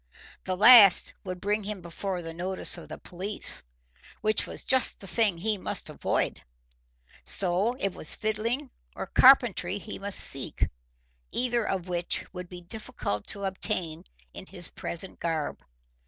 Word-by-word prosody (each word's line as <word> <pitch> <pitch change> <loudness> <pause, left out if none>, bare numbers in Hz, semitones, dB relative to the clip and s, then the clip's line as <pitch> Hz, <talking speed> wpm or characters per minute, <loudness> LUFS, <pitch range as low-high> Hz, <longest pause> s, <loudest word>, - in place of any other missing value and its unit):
The 185 -1 -2
last 215 -2 +8
would 185 -1 -6
bring 205 +3 -1
him 205 0 -5
before 180 +1 -5
the 165 0 -7
notice 185 +3 +1
of - - -11
the - - -7
police, 190 +4 -3 0.6
which 215 -1 +1
was - - -8
just 260 -1 +2
the - - -11
thing 205 -2 +1
he 210 +3 0
must - - -2
avoid; - - -1 0.8
so 195 +5 +1
it 195 -8 -2
was 155 - +3
fiddling 230 +6 -2 0.2
or - - -4
carpentry 235 -8 +5
he 210 +1 -6
must 200 0 -2
seek, 135 -4 -1 0.6
either 240 -2 +2
of 185 -2 -2
which 175 -1 -1
would 180 -1 -8
be 180 -1 -8
difficult 175 - -5
to 200 -1 -2
obtain 175 -3 -1 0.3
in 190 - -10
his 180 -3 -4
present 175 +3 -5
garb. 160 -3 -3
195 Hz, 150 wpm, -27 LUFS, 175-215 Hz, 0.8 s, last